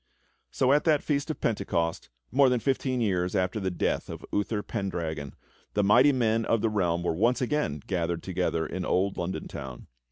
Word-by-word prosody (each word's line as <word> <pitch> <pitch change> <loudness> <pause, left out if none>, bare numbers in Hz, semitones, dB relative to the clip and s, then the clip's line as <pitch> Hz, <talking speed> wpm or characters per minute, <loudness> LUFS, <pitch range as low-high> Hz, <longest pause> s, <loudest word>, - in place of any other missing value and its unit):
So 130 +1 +2
at 145 - +3
that 155 -3 +3
Feast 145 0 -1
of 155 - -3
Pentecost, 90 -6 -1 0.2
more 135 +1 +5
than 125 -1 +2
fifteen 130 0 0
years 90 -4 0
after 95 +3 0
the 95 -2 -1
death 90 - -1
of - - -7
Uther 105 +1 0
Pendragon, 80 - -4 0.4
the 105 - +3
mighty 120 +8 +6
men 115 -3 +1
of 115 -1 +1
the 115 - +2
realm 85 -5 0
were 90 - 0
once 115 +10 +2
again 125 - -1
gathered 85 -3 -2
together 90 -3 -1
in 95 - -4
old 95 +2 +1
London 90 +1 -3
Town. 65 -2 -8
100 Hz, 185 wpm, -28 LUFS, 90-125 Hz, 0.4 s, mighty